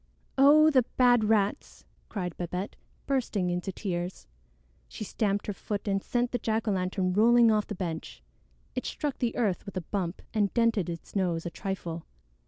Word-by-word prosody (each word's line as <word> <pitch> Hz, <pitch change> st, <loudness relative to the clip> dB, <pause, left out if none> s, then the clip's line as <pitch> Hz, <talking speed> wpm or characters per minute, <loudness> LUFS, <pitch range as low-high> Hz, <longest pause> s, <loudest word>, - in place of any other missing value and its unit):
"Oh, 300 Hz, +3 st, +7 dB
the 260 Hz, -3 st, +5 dB, 0.2 s
bad 245 Hz, -3 st, +5 dB
rats!" 210 Hz, -2 st, 0 dB, 0.2 s
cried 180 Hz, -5 st, -4 dB
Babette, 180 Hz, +3 st, -4 dB, 0.3 s
bursting 230 Hz, -9 st, 0 dB
into 180 Hz, +2 st, -2 dB
tears. 180 Hz, -2 st, -4 dB, 0.6 s
She -, -, -7 dB
stamped 205 Hz, -1 st, -1 dB
her 205 Hz, -, -2 dB
foot 205 Hz, +1 st, -4 dB
and 195 Hz, -1 st, +1 dB
sent 245 Hz, 0 st, 0 dB
the 245 Hz, -, -1 dB
jack 220 Hz, 0 st, -1 dB
o' -, -, +3 dB
lantern 185 Hz, -1 st, 0 dB
rolling 230 Hz, +3 st, +6 dB
off 210 Hz, -1 st, +1 dB
the 210 Hz, -, -4 dB
bench. 165 Hz, -, -5 dB, 0.5 s
It -, -, -3 dB
struck 290 Hz, -3 st, -3 dB
the 240 Hz, -2 st, 0 dB
earth 210 Hz, -7 st, 0 dB
with 200 Hz, -, -7 dB
a -, -, -1 dB
bump 175 Hz, 0 st, -3 dB
and 205 Hz, -3 st, +2 dB
dented 230 Hz, -6 st, +2 dB
its 165 Hz, +3 st, -8 dB
nose 175 Hz, -4 st, 0 dB
a 175 Hz, -, -3 dB
trifle. 170 Hz, -3 st, -5 dB
200 Hz, 175 wpm, -29 LUFS, 180-230 Hz, 0.6 s, Oh